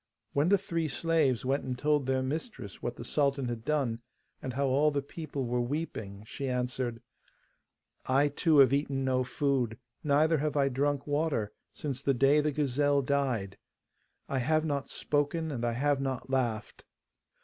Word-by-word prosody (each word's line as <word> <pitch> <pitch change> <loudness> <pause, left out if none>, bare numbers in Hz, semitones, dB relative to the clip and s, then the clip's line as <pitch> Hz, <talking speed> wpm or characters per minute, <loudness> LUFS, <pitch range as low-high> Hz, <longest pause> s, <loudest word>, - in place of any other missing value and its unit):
When 145 +4 +2
the 200 - +6
three 165 -4 -2
slaves 150 -4 +1
went 135 +2 +1
and 125 -1 -3
told 145 0 +1
their 130 0 +1
mistress 135 - -5
what - - -3
the - - -8
sultan 140 -3 0
had 115 -2 -4
done, 135 -5 0 0.4
and 130 - -4
how 140 +2 0
all 140 +3 +3
the 145 -2 -1
people 145 -3 -5
were 120 +1 0
weeping, 120 -7 -4
she 135 +4 -4
answered: 125 -2 -2 1.0
'I 140 +3 +4
too 155 +2 +2
have 135 -2 +7
eaten 140 -1 0
no 130 -1 +2
food, 125 -4 0 0.3
neither 150 +2 +3
have 150 0 -1
I 140 -1 +3
drunk 140 +2 0
water, 145 -8 0 0.2
since 140 -3 -4
the 140 -1 +1
day 140 +4 +5
the 150 0 0
gazelle 145 0 +2
died. 125 -8 -1 0.7
I 135 - -1
have 155 +5 +2
not 140 -3 -2
spoken, 150 +2 -1
and 120 -4 -4
I 120 0 +1
have 140 +3 +1
not 135 -1 -3
laughed. 120 -5 -1
140 Hz, 170 wpm, -30 LUFS, 125-150 Hz, 1.0 s, have